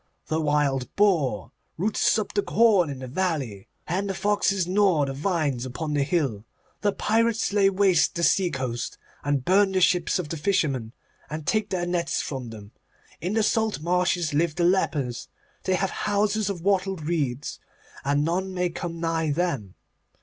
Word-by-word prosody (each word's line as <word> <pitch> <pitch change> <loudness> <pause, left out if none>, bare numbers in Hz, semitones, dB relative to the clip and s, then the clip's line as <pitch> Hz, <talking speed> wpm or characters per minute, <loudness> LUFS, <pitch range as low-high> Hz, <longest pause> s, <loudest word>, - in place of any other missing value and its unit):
The 160 +1 0
wild 145 -4 +1
boar 150 - +2 0.3
roots 205 +6 +2
up 215 -2 -3
the 205 - +2
corn 200 -7 +3
in 140 - -5
the 130 0 -7
valley, 135 - -2 0.2
and 190 +4 -2
the 195 - -2
foxes 200 -1 +1
gnaw 185 -5 +3
the 135 - -4
vines 145 -5 -1
upon 150 +4 -4
the 145 - +1
hill. 140 - 0 0.4
The 205 - +2
pirates 225 +1 +1
lay 200 -1 +4
waste 190 -3 +3
the 170 - -2
sea 185 +1 +3
coast 130 -5 -4 0.3
and 140 -2 0
burn 195 +1 +4
the 190 - +2
ships 180 -1 +3
of 175 -5 -4
the 165 - -3
fishermen, 140 - 0 0.4
and 155 0 -5
take 215 +2 0
their 180 -2 -1
nets 175 -1 -1
from 130 -4 -4
them. 105 -2 -11 0.5
In 180 +4 -2
the 220 0 +2
salt 220 -2 +1
marshes 175 -1 +1
live 155 +1 +1
the 175 - 0
lepers; 150 -9 0 0.4
they 185 - +2
have 190 +1 -1
houses 205 0 0
of 185 -4 -4
wattled 190 -2 0
reeds, 145 -5 -2 0.4
and 145 +1 +1
none 185 +3 -1
may 180 -1 0
come 170 0 -5
nigh 165 -1 0
them. 140 - -2
170 Hz, 170 wpm, -25 LUFS, 145-195 Hz, 0.5 s, lay